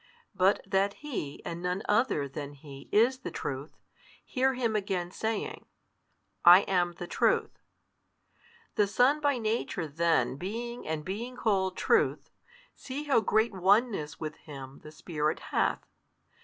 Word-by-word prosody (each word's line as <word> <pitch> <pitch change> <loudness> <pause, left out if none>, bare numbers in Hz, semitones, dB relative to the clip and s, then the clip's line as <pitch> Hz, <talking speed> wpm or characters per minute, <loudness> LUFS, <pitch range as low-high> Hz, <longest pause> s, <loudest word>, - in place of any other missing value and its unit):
But 190 +2 +3
that 195 +1 +1
He 180 - -5
and 170 0 -5
none 180 +3 -2
other 210 - +2
than 145 +1 -7
He 140 -1 -12
is 240 +5 +4
the 260 - -5
Truth, 140 +2 -5 0.5
hear 265 0 +1
Him 235 -3 0
again 190 -4 -1
saying, 220 +1 -3 0.8
I 175 +2 +10
am 180 -3 0
the 175 - -7
Truth. - - +1 1.1
The 210 - +2
Son 255 +8 +3
by 285 -3 +2
Nature 220 -6 -1
then 145 -5 +1
being 235 +8 -5
and 155 -1 -3
being 230 +7 -5
called 190 -5 +1
Truth, - - +1 0.4
see 275 +3 -6
how 285 -5 +3
great 220 +2 +2
Oneness 195 -3 +2
with 155 -1 -5
Him 135 -3 -10
the 150 - -11
Spirit 155 -1 -2
hath. - - +1
190 Hz, 140 wpm, -29 LUFS, 155-230 Hz, 1.1 s, I